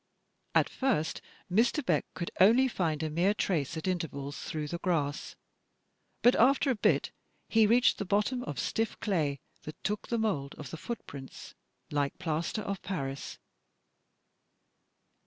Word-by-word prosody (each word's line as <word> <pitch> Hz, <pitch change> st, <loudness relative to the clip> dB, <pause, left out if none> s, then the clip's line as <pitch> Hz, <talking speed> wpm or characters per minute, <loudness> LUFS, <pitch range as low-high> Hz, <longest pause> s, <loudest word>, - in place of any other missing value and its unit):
At -, -, +5 dB
first 245 Hz, -, 0 dB, 0.3 s
Mr. 240 Hz, -, +2 dB
Beck 160 Hz, -7 st, +1 dB
could 170 Hz, -, -4 dB
only 235 Hz, +8 st, +6 dB
find 165 Hz, -, -1 dB
a 155 Hz, -, -1 dB
mere 180 Hz, +6 st, +2 dB
trace 160 Hz, -7 st, -1 dB
at 160 Hz, -, -4 dB
intervals 150 Hz, -6 st, -3 dB
through 155 Hz, -1 st, -4 dB
the 170 Hz, -, -3 dB
grass, 150 Hz, -6 st, -1 dB, 0.9 s
but 245 Hz, -, +7 dB
after 270 Hz, +3 st, +4 dB
a -, -, +1 dB
bit 210 Hz, -, +2 dB, 0.4 s
he 220 Hz, -1 st, +4 dB
reached 240 Hz, +3 st, +4 dB
the -, -, 0 dB
bottom 210 Hz, +6 st, +1 dB
of 145 Hz, -, -5 dB
stiff 225 Hz, -, -1 dB
clay 150 Hz, -9 st, 0 dB, 0.2 s
that 155 Hz, -, -10 dB
took 210 Hz, 0 st, -2 dB
the 235 Hz, -, 0 dB
mould 160 Hz, -12 st, -1 dB
of 145 Hz, -4 st, -8 dB
the -, -, -4 dB
footprints 150 Hz, -, -8 dB, 0.4 s
like 145 Hz, -1 st, 0 dB
plaster 170 Hz, +4 st, -2 dB
of 200 Hz, -2 st, -4 dB
Paris. 140 Hz, -7 st, -4 dB
180 Hz, 145 wpm, -30 LUFS, 150-220 Hz, 0.9 s, but